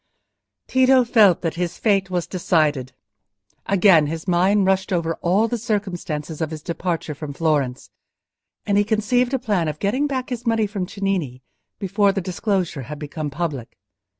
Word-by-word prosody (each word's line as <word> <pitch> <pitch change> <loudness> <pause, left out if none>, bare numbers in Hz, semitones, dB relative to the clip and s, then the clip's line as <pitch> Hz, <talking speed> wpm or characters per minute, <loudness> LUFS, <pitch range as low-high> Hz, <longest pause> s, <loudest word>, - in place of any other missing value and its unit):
Tito 260 0 +4
felt 215 -7 +4
that 165 - -1
his 175 0 -2
fate 195 -3 +1
was 180 -2 -1
decided. 155 -8 0 0.8
Again 185 -6 +5
his 160 +3 -5
mind 190 +3 +3
rushed 190 0 +1
over 165 -2 0
all 195 +6 +2
the 235 +1 -3
circumstances 175 -8 -3
of 160 - -1
his 155 -1 -7
departure 170 -2 -3
from 145 0 -7
Florence, 140 -5 -1 0.7
and 200 0 +2
he - - +4
conceived 225 +4 +1
a - - +2
plan 205 -10 0
of 150 -1 -3
getting 255 - 0
back 260 -2 -3
his 245 -1 -4
money 225 -1 +2
from 200 -3 -4
Cennini 180 - -3 0.3
before 200 +1 +2
the 195 - -2
disclosure 185 -4 -2
had 150 - -5
become 150 +1 -5
public. 140 -5 -4
185 Hz, 160 wpm, -22 LUFS, 160-210 Hz, 0.8 s, Again